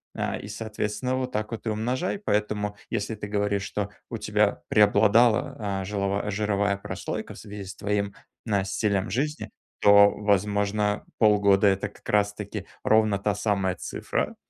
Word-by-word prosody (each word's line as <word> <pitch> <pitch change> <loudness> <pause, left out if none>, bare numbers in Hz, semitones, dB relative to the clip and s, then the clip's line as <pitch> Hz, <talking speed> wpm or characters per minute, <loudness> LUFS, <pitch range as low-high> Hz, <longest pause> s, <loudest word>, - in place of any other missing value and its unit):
э, - - -2
и, - - -8
соответственно, 110 +4 -3
вот 130 -1 -2
так 105 +1 -3
вот 115 0 -6
и - - +2
умножай. 125 - -1
Поэтому, 105 - -1
если 110 0 -2
ты 105 0 -6
говоришь, 105 -1 0
что 100 0 -3 0.2
у - - -4
тебя - - +1
преобладала, 105 +1 +3
э, - - -6
жилова 100 +1 -1
жировая 100 -1 0
прослойка 100 - -5
в - - -11
связи 105 -2 -8
с 95 +1 -8
твоим 100 -1 -2 0.3
н 100 -3 +1
стилем 100 +1 0
жизни, 150 +8 -2 0.3
то, 100 0 +8
возможно, 105 0 0
полгода- 105 -2 +5
это 100 +1 +1
как - - -14
раз 105 0 +2
таки 105 -1 -6 0.2
ровно 110 -2 +3
та 100 0 0
самая 100 -3 0
цифра, - - -3
105 Hz, 155 wpm, -26 LUFS, 100-110 Hz, 0.3 s, то